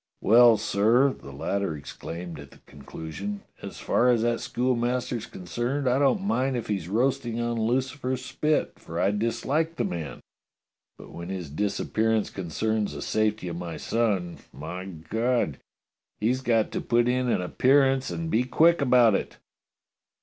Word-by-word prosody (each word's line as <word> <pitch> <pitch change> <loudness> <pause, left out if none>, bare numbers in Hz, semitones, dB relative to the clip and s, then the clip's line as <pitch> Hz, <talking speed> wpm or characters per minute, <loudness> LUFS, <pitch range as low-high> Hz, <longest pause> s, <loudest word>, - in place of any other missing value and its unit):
"Well, 115 +1 +7
sir," 115 +6 +3
the 70 - -12
latter 85 +4 -2
exclaimed 85 +3 -7
at 70 -1 -11
the - - -17
conclusion, 80 +8 -7 0.2
as - - -8
far 125 - +2
as 120 -2 +3
that 120 0 +1
schoolmaster's 125 -1 -1
concerned, 120 +10 -3
I 125 +2 +3
don't 145 +8 +2
mind 135 - 0
if 115 - -4
he's 95 -6 -3
roasting 120 +1 0
on 120 -1 -1
Lucifer's 130 +2 -1
spit, 150 +4 -1
for 85 +1 -6
I 95 - +3
dislike 135 +10 -1
the - - -1
man, 85 -4 -4 0.8
but - - -12
when 85 +1 -8
his 90 -6 -5
disappearance 110 +5 0
concerns 105 +4 -2
the - - -6
safety 110 -3 0
of 85 -1 -4
my 85 -2 -5
son, 100 -7 -1
my 90 +5 -7
God! 95 - -1 0.6
he's 125 +5 +1
got 115 -4 +1
to - - -2
put 120 0 +2
in 125 0 +1
an - - +2
appearance 135 +6 +3
and 165 -1 -4
be 115 - +3
quick 165 +6 +4
about 125 -4 +5
it. - - -2
115 Hz, 155 wpm, -26 LUFS, 95-125 Hz, 0.8 s, Well